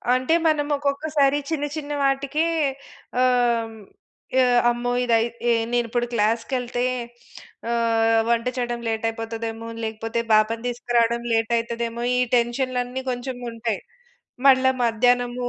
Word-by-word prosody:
అంటే 255 +5 +1
మనం 300 -2 +2
ఒక్కొక్కసారి 285 0 +1
చిన్న 295 -3 -1
చిన్న 295 -1 -5
వాటికే 275 +3 +1 0.8
ఆహ్, 245 -2 +3
హ్మ్, 220 - -12 0.6
ఆహ్, 245 -1 +4
అమ్మో! 240 +1 -2 0.8
నేను 240 0 +2
ఇప్పుడు 240 +1 -1
క్లాస్‌కెళ్తే 240 +3 0 0.9
ఆహ్, 225 -1 +2
వంట 235 0 +1
చేయడం 240 -1 -2
లేట్ 225 0 -2
అయిపోతదేమో! 225 0 -5 0.2
లేకపోతే 225 +1 -3
పాపను 220 +2 +3
తీసుకురావడం 235 -1 0
లేట్ 225 +1 +1
అయితదేమో! 235 0 -3
ఈ - - +2 0.2
టెన్షన్‌లన్నీ 250 +1 -1
కొంచెం 245 +1 -4
ఉంటాయి. 230 -2 -3 0.7
మళ్ళా 260 -1 +5
మధ్యాహ్నము 245 +1 +1
240 Hz, 110 wpm, -23 LUFS, 230-255 Hz, 0.9 s, మళ్ళా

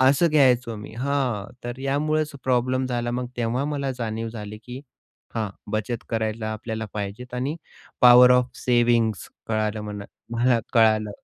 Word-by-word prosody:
असं 140 +6 +5
घ्यायचो 125 -6 +3
मी 105 +1 -9
हां, 130 -6 0 0.2
तर 120 +1 -5
यामुळेच 150 +3 0
प्रॉब्लेम 130 +1 +1
झाला, 120 -1 -2
मग 125 +1 -2
तेव्हा 120 +3 -1
मला 140 -2 -2
जाणीव 115 -1 -3
झाली 105 -2 -7
की 125 +2 -8 0.5
हां, 110 -3 -2 0.2
बचत 110 +2 -2
करायला 110 -1 -2
आपल्याला 110 0 -4
पाहिजेत 105 +5 -5
आणि 135 +6 -2 0.5
पॉवर 125 0 +9
ऑफ 125 0 +3
सेव्हिंग्ज 120 -4 +2 0.2
कळालं 110 -1 -1
म्हणा 105 -1 -6 0.3
मला 120 0 +3 0.2
कळालं. 110 -2 +4
120 Hz, 145 wpm, -24 LUFS, 110-130 Hz, 0.5 s, पॉवर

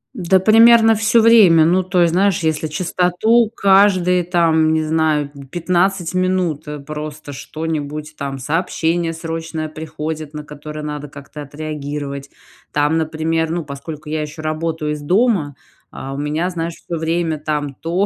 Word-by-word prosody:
Да, 190 +1 +2
примерно 225 +2 +6
всё 225 +1 +3
время. 200 -9 +6
Ну, 180 +3 +3
то 180 0 0
есть, 170 -1 +3
знаешь, 195 0 +2
если 155 0 0
чистоту 180 +8 +1
каждые, 190 -2 +4
там, 165 -2 +2
не 160 0 +1
знаю, 155 -2 0
м, 140 -1 -12
15 175 +3 0
минут, 185 -4 0
э, 150 0 -5
просто, 150 0 -7
что-нибудь, 155 0 -5
там, 140 -1 -5
сообщение 165 +3 -1
срочное 160 -1 -5
приходит, 155 0 -6
на 150 - -5
которое 150 +1 -8
надо 150 -1 -5
как-то 140 +1 -10
отреагировать. 145 -1 -6 0.4
Там, 150 +2 +1
например, 160 +1 -1
ну, 170 -2 -3
поскольку 150 +2 -8
я 155 0 -2
ещё 155 +1 -7
работаю 155 0 -2
из 150 0 -4
дома, 180 - +1 0.3
а, 135 +1 -7
у - - -6
меня, 150 +5 -1
знаешь, 170 -1 -3
всё 170 +1 -6
время 165 -1 -1
там: 150 -2 -3
то 170 +8 -1
160 Hz, 155 wpm, -18 LUFS, 150-180 Hz, 0.4 s, примерно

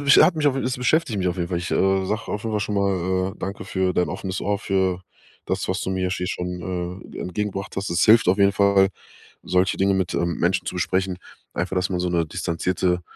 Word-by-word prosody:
mich 140 -1 +6
hat 175 - +6
mich 155 - -1
es 130 -2 +1
beschäftigt 125 -3 +1
mich 90 -1 +1
auf 90 - -2
jeden 85 -1 -2
Fall. 85 - -1
Ich, 90 - -5
äh, 95 0 +2
sage 110 +3 -2
auf 105 - -3
jeden 110 -1 -3
Fall 105 - 0
schon 105 0 -2
mal, 95 -1 0
äh, - - -21
danke 95 0 -5
für 95 -1 0
dein 90 - +1
offenes 95 0 -4
Ohr, 100 -1 0
für 95 -2 0 0.4
das, - - -2
was 95 +1 -1
du 95 - -2
mir 95 -1 -1
hier 90 -1 -2
schon, 90 0 -4
äh, - - -8
entgegengebracht 100 +1 -4
hast. 100 +1 -2
Das 85 - +1
hilft 110 -2 +6
auf 95 - +3
jeden 100 0 +5
Fall, 100 -1 +4 0.6
solche 90 +1 +2
Dinge 95 0 +3
mit, 95 -2 -1
ähm, 85 -1 0
Menschen 90 +2 +1
zu - - -3
besprechen. 95 +1 0 0.4
Einfach, 90 +2 -2
dass 90 +1 +1
man 90 - -1
so 90 - 0
'ne 85 -2 +1
distanzierte 90 +2 -1
95 Hz, 235 wpm, -23 LUFS, 90-100 Hz, 0.6 s, mich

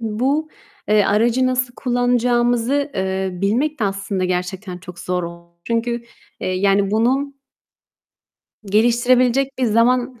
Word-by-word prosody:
bu, 260 +8 -1 0.4
eee, 210 -1 +4
aracı 235 +6 +2
nasıl 255 -1 -1
kullanacağımızı, 245 +2 +1
eee, 190 0 -1
bilmek 230 - -1
de - - +2
aslında 195 -1 -2
gerçekten 180 +1 -3
çok 180 -1 -11
zor 180 0 -2
oldu. 170 0 -9
Çünkü, 235 +1 -1 0.4
eee, - - -2
yani, 195 +1 +2
bunu 270 +6 0 1.3
geliştirebilecek 245 +5 +2
bir 255 - +1
zaman 240 +2 +2
230 Hz, 120 wpm, -20 LUFS, 195-250 Hz, 1.3 s, eee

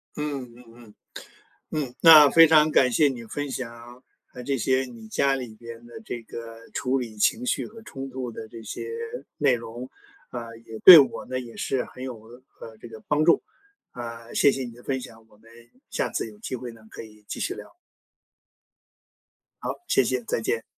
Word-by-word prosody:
嗯 150 -2 -3
嗯 125 - -15
嗯， 115 -3 -16 0.9
嗯， 125 -2 -11
那 155 -4 +9
非 165 0 +8
常 155 -1 +5
感 130 -4 +4
谢 145 +5 +4
你 125 -4 -6
分 145 +5 -5
享， 120 0 -8 0.3
呃， 125 - -9
这 135 +2 -1
些 130 +2 +1
你 120 -3 -11
家 135 +5 +2
里 125 -4 -7
边 115 +1 -11
的 120 - -11
这 120 - -6
个 115 0 -10
处 130 +1 0
理 115 -4 -6
情 230 - +1
绪 250 - -1
和 225 +1 -13
冲 135 -10 -8
突 130 -1 -5
的 110 -1 -9
这 115 +1 -11
些 110 - -6 0.5
内 140 -3 +3
容。 120 +2 -7 0.4
啊， 115 -2 -7
也 110 0 -8
对 180 -3 +12
我 140 - +2
呢， 130 0 -4
也 120 -2 -11
是 135 -2 -2
很 130 - -10
有， 120 -4 -7 0.4
呃， 110 -1 -10
这 - - -8
个 110 -1 -11
帮 150 +1 +2
助， 170 - +4 0.5
啊， 115 -1 -8
谢 140 - +5
谢 135 - -3
你 120 -2 -7
的 120 +1 -16
分 130 0 -2
享， 115 -2 -13
我 105 - -24
们 115 +1 -20 0.4
下 - - -2
次 - - -3
有 210 - -17
机 215 - -6
会 125 0 -6
呢 115 -1 -17
可 - - -9
以 105 -1 -16
继 - - -6
续 - - -2
聊。 - - -12 1.9
好， - - -2
谢 135 - +3
谢， 125 0 -1
再 - - -2
见。 115 0 -1
125 Hz, 210 characters per minute, -25 LUFS, 115-135 Hz, 1.9 s, 对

